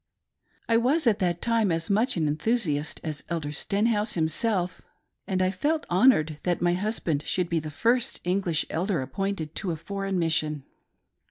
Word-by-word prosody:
I 230 - +4
was 270 +7 +2
at 220 -3 +3
that 175 -3 0
time 230 -4 +2
as 165 0 -1
much 220 +3 +1
an 155 -2 +1
enthusiast 155 -2 0
as 155 -3 -4
Elder 160 -4 -2
Stenhouse 210 +7 0
himself, 180 +3 0 0.5
and 185 -1 +1
I 185 - +2
felt 305 +9 -1
honored 175 - +4
that 175 -1 0
my 175 0 +2
husband 180 -6 -1
should 180 -2 0
be 170 - +1
the 155 0 -6
first 235 - +1
English 180 -3 +1
elder 175 -3 0
appointed 195 -1 -3
to 190 - -2
a 165 - -1
foreign 195 +3 -3
mis 165 -2 +1
sion. 150 -3 0
185 Hz, 170 wpm, -26 LUFS, 160-215 Hz, 0.5 s, I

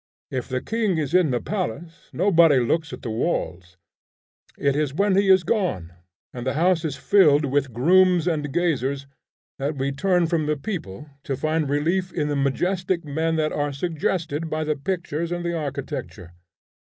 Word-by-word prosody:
If 130 0 -4
the 130 0 -2
king 220 -6 0
is 150 0 -2
in 180 -4 +4
the 125 -2 0
palace, 170 - -5
nobody 170 -6 +4
looks 150 +5 0
at - - -9
the 115 - -3
walls. 95 - -3 0.8
It 140 -1 +1
is 145 -2 -1
when 200 +2 +2
he 195 0 +3
is 190 -1 +6
gone, 170 - -1 0.4
and 120 - -6
the 130 +2 -2
house 175 +1 +2
is 150 -4 -2
filled 150 -4 +4
with 140 -1 0
grooms 180 +7 +4
and 150 -4 -1
gazers, 140 -5 0 0.5
that 145 +3 -2
we 135 +1 -1
turn 180 +4 +1
from 160 -2 0
the 150 0 0
people 150 - -6 0.2
to 135 - -2
find 155 0 0
relief 170 +6 0
in 150 -3 -2
the 145 - -1
majestic 175 +6 0
men 160 +3 -1
that 155 -1 0
are 145 -1 -1
suggested 160 +1 -2
by 155 0 -2
the 155 0 0
pictures 170 0 -3
and 175 0 -3
the 170 - -1
architecture. 140 - -5
155 Hz, 175 wpm, -23 LUFS, 140-175 Hz, 0.8 s, is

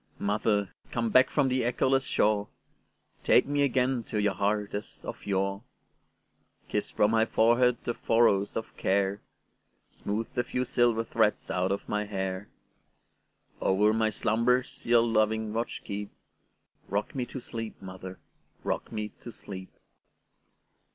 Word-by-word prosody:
Mother, 105 -2 0 0.2
come 115 -2 -1
back 130 +3 +6
from 140 -3 +2
the 130 0 +1
echoless 130 +2 +2
shore, 105 -1 +2 0.8
Take - - +5
me 145 +1 0
again 130 -2 +2
to 105 - -2
your 105 -1 +2
heart 105 +2 -1
as 105 - -6
of - - -7
yore; 100 0 0 1.1
Kiss - - -1
from 105 +1 +2
my 110 -1 +4
forehead 120 +2 +4
the 120 - -1
furrows 115 -4 +2
of 110 - -6
care, 100 +1 +1 0.7
Smooth 110 +2 -3
the 120 - 0
few 125 +1 -2
silver 120 -2 +2
threads 110 -1 +1
out 90 +1 0
of 100 - -3
my 105 0 -1
hair; 95 -1 -4 1.1
Over 105 +3 +3
my 110 0 +2
slumbers 115 +3 +1
your 120 -1 +5
loving 110 -1 +1
watch 115 +2 -3
keep;—Rock 100 0 -7
me 125 -3 -2
to 130 - -6
sleep, 115 -2 -6
mother,—rock 95 0 -7
me 105 -1 -3
to 120 - -8
sleep! 95 -3 -7
110 Hz, 135 wpm, -28 LUFS, 100-120 Hz, 1.1 s, back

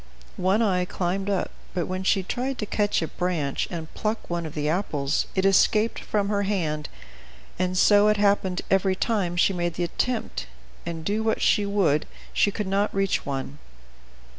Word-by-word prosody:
One 195 +5 +2
Eye 180 -4 +2
climbed 190 +2 -2
up, 195 -2 -1 0.2
but 175 -3 0
when 185 +1 -3
she 190 0 +2
tried 255 +7 -3
to 210 - -2
catch 205 -4 0
a - - -2
branch 165 -7 -1
and 165 -2 -6
pluck 215 -3 -3
one 170 -1 -2
of 150 - -10
the 150 -1 -1
apples, 150 -4 0
it 190 0 +1
escaped 210 +3 +3
from 205 -2 -1
her 205 -1 +1
hand, 165 -7 -1 0.7
and 185 0 0
so 205 +2 +6
it 210 0 +3
happened 200 -3 +2
every 190 0 +3
time 190 -5 0
she 195 - +4
made 175 -2 -2
the 175 - -1
attempt, 220 - -2 0.4
and, 165 -2 -5
do 210 +2 0
what 220 0 0
she 205 -1 +3
would, 180 -8 +2 0.3
she - - +3
could 210 +1 -3
not 200 +2 +1
reach 195 -5 0
one. 140 +1 -4
190 Hz, 180 wpm, -25 LUFS, 170-205 Hz, 0.7 s, so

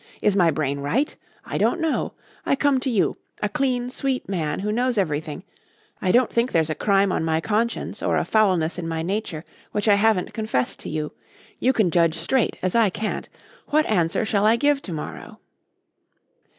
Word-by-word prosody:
Is 205 -2 +2
my 175 -4 +4
brain 140 -3 -1
right? 230 - 0 0.3
I - - -3
don't 350 - +2
know. 325 -2 -1 0.3
I - - +2
come 275 -1 +2
to 265 - -2
you 220 -6 +1 0.2
a 210 - 0
clean, 250 +2 -1
sweet 265 -1 -2
man 165 -5 -2
who 210 +1 -1
knows 245 +1 0
everything 155 -2 -2 0.6
I 185 - +2
don't 245 +2 +3
think 235 +2 +1
there's 160 -1 +1
a - - +1
crime 195 +3 +2
on - - 0
my 160 0 +1
conscience 220 +6 -1
or - - +1
a - - 0
foulness 185 -6 +2
in 165 - -4
my 165 0 -2
nature 180 -4 -3 0.3
which 210 +1 -1
I 210 - +7
haven't 200 -2 +2
confessed 215 - -1
to - - -7
you. 155 -1 -3 0.5
You 260 - +3
can 215 -9 +2
judge 165 -1 +3
straight 210 +9 0
as 185 - 0
I 230 -3 +4
can't. 215 +3 -4 0.4
What 305 +1 +3
answer 175 -1 +1
shall 205 -1 +1
I 225 - +5
give 285 +3 +2
to 185 - -8
morrow?" 155 -2 -7
200 Hz, 190 wpm, -23 LUFS, 165-235 Hz, 0.6 s, I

